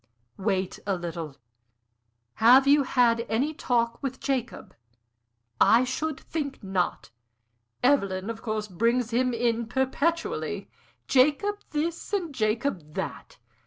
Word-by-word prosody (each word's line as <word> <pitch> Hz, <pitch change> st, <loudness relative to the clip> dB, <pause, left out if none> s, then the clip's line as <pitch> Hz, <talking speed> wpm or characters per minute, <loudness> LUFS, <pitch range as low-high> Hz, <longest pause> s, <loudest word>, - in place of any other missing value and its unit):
"Wait 190 Hz, -2 st, -1 dB
a 195 Hz, -, +1 dB
little. 165 Hz, -4 st, -6 dB, 1.0 s
Have 250 Hz, +4 st, +7 dB
you 285 Hz, +1 st, +5 dB
had 240 Hz, -3 st, +2 dB
any 260 Hz, +8 st, 0 dB
talk 235 Hz, -4 st, 0 dB
with 265 Hz, -2 st, -4 dB
Jacob?" 260 Hz, -4 st, -3 dB, 0.9 s
"I 235 Hz, +3 st, +6 dB
should 280 Hz, +4 st, -3 dB
think 280 Hz, -7 st, -5 dB
not! 190 Hz, -9 st, -2 dB, 0.7 s
Evelyn, 200 Hz, -8 st, +2 dB
of 225 Hz, -, -9 dB
course, 215 Hz, -2 st, -3 dB
brings 230 Hz, +5 st, 0 dB
him 250 Hz, +2 st, +2 dB
in 235 Hz, -1 st, 0 dB
perpetually 275 Hz, +7 st, -1 dB, 0.4 s
Jacob 300 Hz, +11 st, +3 dB
this 330 Hz, +5 st, -3 dB
and 350 Hz, -7 st, -1 dB
Jacob 215 Hz, -, -1 dB
that. -, -, -5 dB
240 Hz, 115 wpm, -27 LUFS, 215-280 Hz, 1.0 s, Have